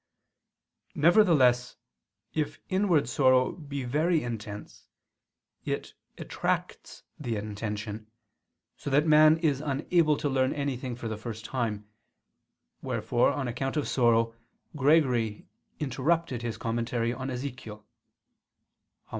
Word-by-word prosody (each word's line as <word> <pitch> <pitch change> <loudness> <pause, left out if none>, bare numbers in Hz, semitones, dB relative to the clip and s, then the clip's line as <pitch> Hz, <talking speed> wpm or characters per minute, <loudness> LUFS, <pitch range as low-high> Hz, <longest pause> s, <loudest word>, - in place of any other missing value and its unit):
Nevertheless 145 - +4 0.6
if 150 -1 -2
inward 185 - +2
sorrow 130 0 +3
be 140 -4 -6
very 155 +6 +1
intense, 105 -3 -7 0.8
it - - -4 0.2
attracts - - -3 0.2
the 120 -6 -3
intention, 105 +1 -5 0.7
so - - -5
that 145 +3 +3
man 155 0 +6
is 150 -5 0
unable 150 +2 +1
to 145 - -1
learn 130 -1 +1
anything 130 -4 -3
for 120 -1 -6
the 110 -1 -4
first 110 -1 -7
time: 110 -5 -3 0.9
wherefore 120 - +1
on 135 -3 -3
account 135 +4 -3
of 150 - 0
sorrow 115 -2 +2 0.4
Gregory 130 -7 +2 0.3
interrupted 145 -1 0
his 120 -2 -4
commentary 115 +1 -1
on 130 +1 -5
Ezechiel 125 -4 -6
(Hom. 105 - -29
130 Hz, 110 wpm, -28 LUFS, 115-150 Hz, 0.9 s, man